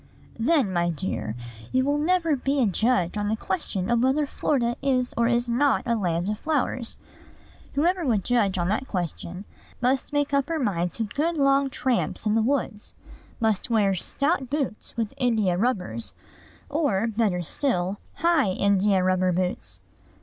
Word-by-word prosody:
"Then, 245 - +2
my 175 -1 +1
dear, 160 - -3 0.4
you 260 0 +2
will 290 +1 +1
never 330 -1 +2
be 275 +2 -1
a 255 - +4
judge 210 -2 +1
on 205 - -1
the 220 - +1
question 235 - -1
whether 270 +4 +2
Florida 240 -4 0
is 255 -3 +1
or 235 0 +2
is 240 0 +1
not 265 +4 +2
a 235 - +1
land 175 -4 -1
of 210 0 -2
flowers. 260 -6 -1 0.8
Whoever 345 +5 +2
would 225 - +1
judge 215 -5 +1
on 175 -1 0
that 220 +6 -1
question 180 +1 -4 0.3
must 255 +2 0
make 290 -1 0
up 280 +2 +1
her 330 - 0
mind 180 - 0
to 230 - -2
good 310 +10 -1
long 275 -1 +3
tramps 255 -3 -1
in 210 - +2
the 225 - +3
woods; 230 -4 -2 0.4
must 220 -1 0
wear 210 -4 +3
stout 270 - -1
boots, 270 -7 -3
with 225 -1 -2
India 225 -8 +2
rubbers, 180 - -1 0.5
or, 280 -9 +1
better 210 -6 0
still, 190 - -1 0.2
high 300 - +2
India 200 -1 +2
rubber 185 0 +2
boots. 180 +1 -3
235 Hz, 160 wpm, -25 LUFS, 195-275 Hz, 0.8 s, a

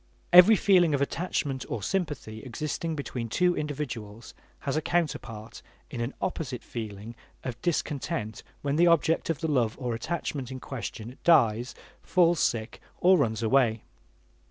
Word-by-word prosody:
Every 180 +5 +10
feeling 180 -6 +4
of 140 - -2
attachment 140 -4 -2
or 105 - -4
sympathy 145 - -3
existing 155 +6 -4
between 125 -5 -4
two 180 +7 +2
individuals 120 -7 -5 0.3
has 140 -1 -2
a 155 - +1
counterpart 120 -10 -3 0.3
in 120 - -4
an 120 +4 -3
opposite 135 -9 -3
feeling 110 -1 -7 0.3
of 120 -2 -6
discontent 145 -8 -2 0.2
when 145 +1 0
the 175 +1 +5
object 165 -1 +2
of 160 -2 -1
the 160 - 0
love 125 -7 +1
or 125 -3 -2
attachment 140 0 -3
in 130 -1 -6
question 120 -1 -7
dies, 120 -7 +3 0.3
falls 175 -2 +3
sick, 110 -1 -1 0.2
or 185 +1 +6
runs 110 -4 0
away. 115 -2 +2
135 Hz, 145 wpm, -27 LUFS, 115-165 Hz, 0.3 s, Every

